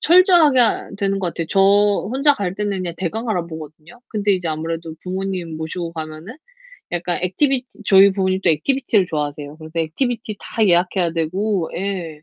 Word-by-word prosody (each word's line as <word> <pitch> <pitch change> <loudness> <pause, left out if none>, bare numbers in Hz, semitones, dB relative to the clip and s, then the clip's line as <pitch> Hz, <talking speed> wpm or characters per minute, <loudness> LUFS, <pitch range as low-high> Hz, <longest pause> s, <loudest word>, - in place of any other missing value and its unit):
철저하게 345 -6 +5
하 235 - +2
되는 195 -1 0
것 185 -2 -1
같아요. 165 -1 -4
저 195 - +2 0.5
혼자 280 +2 +4
갈 195 -7 -3
때는 205 -1 -2
그냥 175 -2 -4
대강 220 +6 -3
알아보거든요. 165 +1 -6
근데 205 -2 0
이제 180 -3 -1
아무래도 160 +1 -4
부모님 185 -3 -4
모시고 165 +2 -5
가면은 160 - -7 0.6
약간 175 0 -1
액티비티 260 +8 +1 0.2
저희 195 0 +7
부모님은 190 -1 0
또 175 - +4
액티비티를 215 - +1
좋아하세요. 145 -1 -4
그래서 160 +1 -7
액티비티 215 - -2
다 220 -2 0
예약해야 175 0 +2
되고 180 +3 -1
예 175 -5 -4
185 Hz, 405 characters per minute, -20 LUFS, 165-210 Hz, 0.6 s, 저희